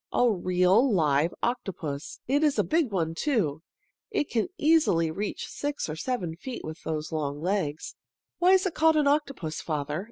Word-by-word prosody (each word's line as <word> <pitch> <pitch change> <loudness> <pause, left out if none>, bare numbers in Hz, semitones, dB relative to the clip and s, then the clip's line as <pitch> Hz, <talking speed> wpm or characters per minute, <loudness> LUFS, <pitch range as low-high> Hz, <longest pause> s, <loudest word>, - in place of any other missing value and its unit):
A 245 - +3
real, 185 +4 +3
live 155 -3 +2
octopus! 180 - -3
It 285 +4 +2
is 295 -2 +2
a - - +3
big 315 -4 +1
one, 165 -5 -1
too. 165 - 0 0.5
It 410 -9 -1
can 230 +4 +1
easily 290 - +3
reach 200 +5 -4
six 290 0 -3
or 155 - -4
seven 175 -3 -3
feet 245 +8 -7
with 155 +1 -7
those 155 -1 -4
long 145 -2 -2
legs." 165 -3 -2 0.5
"Why 360 +2 +5
is 380 0 +4
it 375 - -1
called 320 0 +4
an 300 -1 +3
octopus, 275 - -1
father?" 150 -1 -2
190 Hz, 170 wpm, -27 LUFS, -, 0.5 s, Why